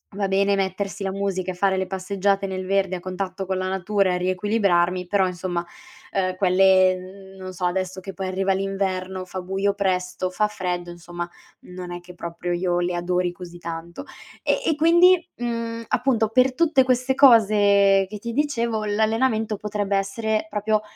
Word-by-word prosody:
Va 200 -1 -1
bene 200 +1 +2
mettersi 195 +1 -2
la 195 - -1
musica 190 -2 -2
e - - -6
fare 190 +1 +1
le 190 0 -1
passeggiate 195 +1 -1
nel 185 -1 -4
verde 195 -1 +1
a - - -5
contatto 190 +1 -4
con 190 0 -2
la 185 0 -2
natura 190 0 +1
e - - 0
riequilibrarmi, 180 -1 +1
però 190 +1 +2
insomma, 175 -1 -3 0.5
uhm, 185 -1 0
quelle 185 0 +4
n 190 +1 -12
non 185 0 -7
so, 180 0 -4
adesso 185 +1 -2
che 195 +1 -8
poi 190 +1 -4
arriva 190 +1 0
l'inverno, 190 -1 -2
fa 185 +1 -6
buio 195 +2 -1
presto, 185 -2 -1
fa 210 +3 +1
freddo, 180 -4 -4
insomma, 175 0 -7 0.3
non 180 -1 -8
è 175 - -5
che 175 +1 -13
proprio 170 +1 -4
io 175 0 0
le 175 0 -1
adori 175 0 -1
così 175 -1 -10
tanto. 170 0 -7 0.4
E - - +1
e 320 - +2
quindi, 345 +3 +5
mhmm, 230 -1 -3
appunto, 240 -4 +1
per 255 +3 +3
tutte 310 -4 +4
queste 255 +1 +1
cose 205 -6 +5
che 210 - -6
ti 235 +3 -5
dicevo, 235 -5 -1
l'allenamento 220 +1 +1
potrebbe 205 -1 -1
essere 215 +2 -1
proprio 210 0 0
195 Hz, 175 wpm, -23 LUFS, 185-210 Hz, 0.5 s, quindi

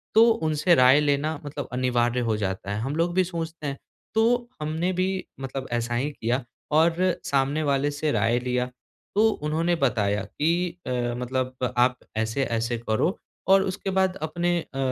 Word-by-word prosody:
तो 225 - +8
उनसे 160 -1 +2
राय 130 +3 +6
लेना 145 +1 0
मतलब 145 -2 -5
अनिवार्य 125 -1 +1
हो 110 - +2
जाता 95 0 -3
है, 105 - -2
हम 135 +5 -2
लोग 170 +1 +1
भी 185 0 +3
सोचते 165 -3 -5
हैं। 140 0 -3 0.4
तो 220 - +4 0.4
हमने 160 +4 -1
भी 185 +1 +1 0.3
मतलब 135 0 -5
ऐसा 120 0 -1
ही 135 +5 0
किया 125 0 -1 0.3
और 165 +2 +4 0.3
सामने 140 +2 +1
वाले 140 0 +1
से 145 +1 -1
राय 115 -1 +2
लिया, 125 0 0 0.5
तो 220 +2 +5
उन्होंने 165 0 0
बताया 105 -8 +1
कि 170 +3 -1
"अ, - - -2 0.3
मतलब 130 +1 -2 0.2
आप 125 0 +4 0.2
ऐसे-ऐसे 115 0 -1
करो 115 - 0 0.3
और 195 0 +6
उसके 195 +1 -3
बाद 190 0 +2
अपने 175 +2 0
अ, 135 - -11
145 Hz, 165 wpm, -25 LUFS, 125-165 Hz, 0.5 s, तो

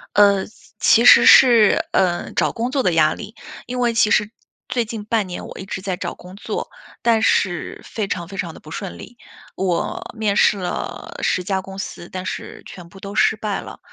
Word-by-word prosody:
呃， 200 -2 +4 0.3
其 235 - +4
实 - - +8
是， 235 -5 +6
嗯， 175 -2 0
找 - - +1
工 235 +1 -3
作 270 -2 0
的 180 - +2
压 155 -1 +3
力。 210 - -9 0.3
因 250 +1 -5
为 240 -1 +1
其 215 -2 +3
实 210 0 +2 0.4
最 250 -2 0
近 220 -1 -7
半 215 -1 0
年， 180 -1 -7
我 - - -10
一 190 - -7
直 190 - -6
在 190 -2 -3
找 185 - -5
工 180 +1 -13
作， 200 - -5 0.3
但 230 -2 +2
是 175 -5 0
非 215 -3 -4
常 175 -3 -4
非 195 - -10
常 170 -4 -4
地 - - -13
不 155 - -14
顺 195 +1 -6
利。 240 - -12 0.4
我 185 -3 -2
面 210 -2 0
试 210 - +4
了 180 -2 -5
10 180 - +1
家 190 0 -1
公 190 +1 -10
司， 175 -2 -7
但 185 0 -6
是 - - -6
全 175 -2 -11
部 195 - -15
都 200 +1 -8
失 215 - +3
败 210 -1 -3
了。 - - -11
200 Hz, 220 characters per minute, -20 LUFS, 185-220 Hz, 0.4 s, 实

